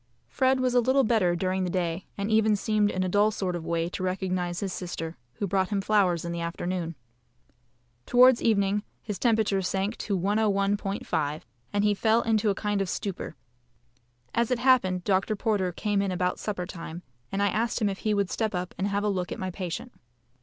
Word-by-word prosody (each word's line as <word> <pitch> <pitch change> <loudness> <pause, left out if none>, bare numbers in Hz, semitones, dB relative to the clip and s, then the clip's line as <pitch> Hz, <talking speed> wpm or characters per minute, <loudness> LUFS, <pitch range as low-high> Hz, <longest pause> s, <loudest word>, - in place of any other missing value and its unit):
Fred 260 - +2
was 255 -1 +1
a 250 - +5
little 260 +3 +3
better 215 -7 +2
during 185 +2 0
the 180 - -1
day, 175 0 -2
and 200 +2 -2
even 220 -1 +4
seemed 210 0 +1
in 185 -2 -1
a - - 0
dull 205 +3 +3
sort 190 -4 -2
of 170 - -4
way 165 0 0
to 185 - -6
recognise 185 -1 -1
his 195 -3 -3
sister, 165 -2 -5 0.2
who 200 - -3
brought 190 -1 +1
him 205 -2 0
flowers 190 -5 +2
in 170 - -3
the 170 0 -3
afternoon. 170 0 -3 1.1
Towards 250 0 +6
evening 205 -2 +2 0.2
his 210 -3 -4
temperature 220 -5 +2
sank 195 +4 -1
to 200 -3 -1
101.5@, 200 -6 0 0.3
and 205 0 +1
he 210 0 +4
fell 220 +3 +2
into 220 -1 +2
a 200 - +1
kind 205 -1 -1
of 195 - -2
stupor. 195 0 -4 1.0
As 235 -1 +1
it 250 - +1
happened, 235 -8 +3
Dr. 195 +2 +1
Porter 200 -4 0
came 205 +3 0
in 200 -1 -1
about 180 0 -1
supper 200 -4 -3
time, 170 -1 -8 0.3
and 195 +1 0
I 205 - +3
asked 230 +4 0
him 215 - +2
if 195 -1 -3
he 215 -1 0
would 200 -2 0
step 220 -3 -1
up 180 0 -3
and 195 - +1
have 200 0 -1
a - - +1
look 185 -3 -1
at - - -3
my 185 -1 -3
patient. 185 +7 -5
200 Hz, 205 wpm, -27 LUFS, 180-215 Hz, 1.1 s, Towards